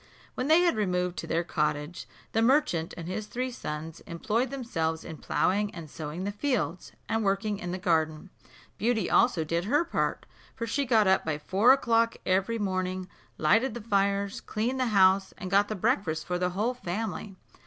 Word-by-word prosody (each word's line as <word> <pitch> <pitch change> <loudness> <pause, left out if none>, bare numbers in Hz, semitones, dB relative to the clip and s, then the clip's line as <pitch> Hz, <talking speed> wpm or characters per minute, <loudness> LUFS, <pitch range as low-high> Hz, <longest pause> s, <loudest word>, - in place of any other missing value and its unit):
When 255 - -2
they 320 +3 +6
had 350 -6 +3
removed 180 -3 0
to - - -6
their 165 +1 0
cottage, 150 0 -2 0.2
the 225 - +1
merchant 230 - +2
and 165 -1 -6
his 210 +3 -4
three 255 +3 -3
sons 160 -7 -6
employed 215 +9 -1
themselves 165 -12 -2
in 160 - -7
ploughing 205 +6 +1
and 160 -4 -9
sowing 155 +3 -5
the 200 - -2
fields, 210 -6 -2 0.2
and 225 0 0
working 200 +1 0
in 175 - -4
the 185 - -2
garden. 160 -1 0 0.5
Beauty 225 0 +1
also 190 -10 +4
did 170 +3 -1
her 295 +10 +2
part, - - -1 0.3
for 230 - -3
she 275 +5 -1
got 225 -3 +4
up 190 0 +3
by 155 -2 -1
four 195 +10 +4
o'clock 230 -3 +3
every 195 +5 +1
morning, 185 -2 -2 0.3
lighted 225 +10 +3
the - - -4
fires, 200 +1 0
cleaned 240 +5 -2
the 255 - +1
house, 190 -2 +4
and 190 -3 -6
got 200 +1 +4
the 215 - -3
breakfast 160 -5 0
for 180 0 -2
the 180 0 +1
whole 210 +7 -1
family. 210 -2 -4
195 Hz, 185 wpm, -28 LUFS, 175-230 Hz, 0.5 s, they